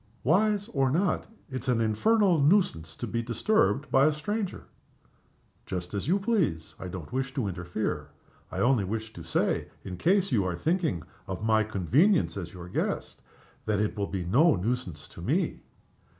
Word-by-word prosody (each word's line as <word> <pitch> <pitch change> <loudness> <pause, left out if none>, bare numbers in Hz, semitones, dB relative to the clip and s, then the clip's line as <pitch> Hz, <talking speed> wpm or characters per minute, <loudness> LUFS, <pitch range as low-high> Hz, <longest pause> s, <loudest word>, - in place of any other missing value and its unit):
"Wise 205 +7 +2
or 135 - +1
not, 180 +8 +1 0.2
it's 130 0 -5
an 125 -2 +2
infernal 175 - +3
nuisance 140 - +2
to - - -4
be 115 - -2
disturbed 140 - +1
by 135 +2 +5
a - - +4
stranger." 195 +7 -3 1.0
"Just 90 0 -4
as 100 +4 -3
you 180 +5 +3
please. 185 - 0
I 95 - -6
don't 90 +2 -7
wish 130 0 -2
to 125 -7 0
interfere. 90 +2 -3 0.4
I - - -2
only 125 -4 +3
wish 110 +3 -4
to 85 - -9
say 80 0 0 0.2
in 90 -2 -6
case 190 - +2
you 110 -6 +3
are 90 -1 -1
thinking 160 - 0 0.2
of 95 +2 -4
my 110 -1 +4
convenience 120 - +2
as 90 -4 -5
your 90 -2 -9
guest 90 - -3 0.5
that 105 -2 +1
it 105 0 0
will 100 -1 -1
be 95 -3 -3
no 135 - +5
nuisance 95 -6 -3
to - - -11
_me. - - 0
115 Hz, 170 wpm, -28 LUFS, -, 1.0 s, by